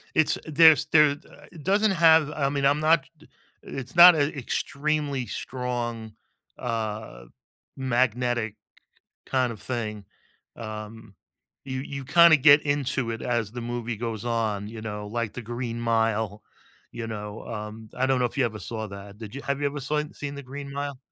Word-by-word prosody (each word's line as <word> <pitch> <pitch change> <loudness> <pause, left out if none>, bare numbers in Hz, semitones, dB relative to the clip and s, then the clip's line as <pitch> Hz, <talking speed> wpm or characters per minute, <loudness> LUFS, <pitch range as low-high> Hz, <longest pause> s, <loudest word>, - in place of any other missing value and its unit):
It's 155 - +3
there's 155 -1 +6
there, 150 -2 +5
uh 145 - -11
it 165 -4 -12
doesn't 205 +4 +3
have 160 -4 +5
I 140 -2 0
mean, 140 -1 -1
I'm 145 +2 +3
not 155 -2 +3 0.6
it's 130 0 -8
not 175 0 +10
a 145 0 0
extremely 140 +1 -2
strong, 120 -3 -4 0.4
uh, 110 - -4 0.5
magnetic 120 -3 0 0.7
kind 130 -3 +1
of 110 - -11
thing, 110 -5 -4 0.5
um, 110 -1 -8 0.5
you 130 -1 -4
you 140 0 -6
kinda 170 +3 +7
get 145 +2 +7
into 140 -4 -1
it 115 - -5
as 115 -3 -1
the 120 - -6
movie 120 -1 -4
goes 115 -1 -4
on, 110 -4 -1
you 110 -1 -8
know, 105 -1 -5
like 115 0 -3
The 125 - -6
Green 120 0 -4
Mile, 110 -2 0 0.5
you 120 -1 -5
know? 105 -1 -7
Um, 110 0 -7
I 130 +1 +1
don't 135 -1 +2
know 125 - +1
if 120 - -9
you 135 - +3
ever 110 -2 -3
saw 110 +2 -5
that, 100 +1 -10
did 110 0 -9
you 140 - -6
have 140 0 -2
you 145 - +1
ever 145 +1 -3
saw 150 +3 -1
seen 145 -1 -6
The 140 - -7
Green 140 +1 -8
Mile? 140 -1 -4
125 Hz, 170 wpm, -26 LUFS, 110-140 Hz, 0.7 s, not